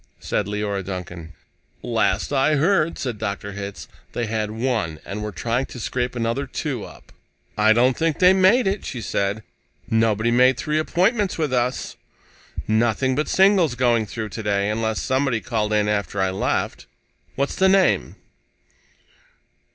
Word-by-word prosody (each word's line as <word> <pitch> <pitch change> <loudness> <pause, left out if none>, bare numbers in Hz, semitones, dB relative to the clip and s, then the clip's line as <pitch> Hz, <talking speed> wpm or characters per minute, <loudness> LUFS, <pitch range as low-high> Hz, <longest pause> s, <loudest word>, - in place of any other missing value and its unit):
said 105 - -2
Leora 105 -1 -2
Duncan. 90 -3 -7 0.5
"Last 115 0 0
I 140 +3 +3
heard," 165 +1 +2
said 120 -5 -4
Dr. 100 -1 -4
Hitz, 100 0 -7 0.3
"they 120 - -1
had 110 -1 -2
one, 110 -9 -2
and 105 +2 -5
were 105 0 -4
trying 115 +8 -2
to 125 - -9
scrape 125 +2 -2
another 120 +4 -1
two 130 -4 -4
up." - - -13 0.4
"I 110 +1 +4
don't 125 +3 +3
think 165 -2 0
they 180 0 +6
made 190 +7 +4
it," 195 +1 -1
she 130 - -5
said. 100 0 -2 0.5
"Nobody 110 0 +2
made 125 +1 +4
three 155 0 -1
appointments 195 +6 +1
with 150 -5 -1
us. 125 0 -1 0.7
Nothing 115 +4 +2
but 150 +4 -1
singles 190 -8 +4
going 120 -3 +2
through 110 0 -5
today, 100 -1 -1
unless 110 0 -1
somebody 130 -3 0
called 110 -2 -2
in 105 -1 +2
after 100 -1 -1
I 95 0 +1
left. 95 - -2 0.5
What's 140 +1 -1
the 190 0 +4
name?" 195 0 +2
115 Hz, 150 wpm, -22 LUFS, 105-140 Hz, 0.7 s, they